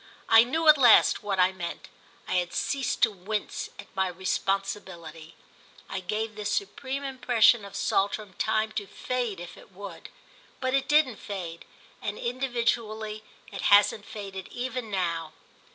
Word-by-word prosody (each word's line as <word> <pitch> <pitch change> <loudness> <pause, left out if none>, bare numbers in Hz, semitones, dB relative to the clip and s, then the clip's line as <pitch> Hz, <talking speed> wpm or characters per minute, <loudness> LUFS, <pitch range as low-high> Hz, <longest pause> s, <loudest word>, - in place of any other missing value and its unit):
I 225 0 +8
knew 315 +7 -1
at 305 -2 +8
last 240 -4 +6
what 200 -2 -2
I 180 +1 +5
meant—I 180 0 -8
had 175 -1 -1
ceased 270 -3 -1
to 225 - +5
wince 205 +2 -4
at - - -9
my 190 0 +1
responsibility. 185 -3 -3 0.5
I - - -4
gave 215 +4 -3
this 210 -1 -3
supreme 275 -8 -3
impression 245 -4 +3
of 200 - -10
Saltram 200 0 0
time 220 0 +1
to 205 -2 -4
fade 245 -6 -3
if 175 0 -9
it - - -16
would; 190 -2 -9 0.5
but 260 0 -1
it 275 0 +1
didn't 295 -7 +3
fade, 175 -5 -6 0.4
and, 205 0 -3
individually, 235 -4 -2 0.3
it 195 - -6
hasn't 205 0 +4
faded 195 -3 -7
even 250 -2 -4
now. 170 -5 -2
210 Hz, 145 wpm, -27 LUFS, 190-240 Hz, 0.5 s, I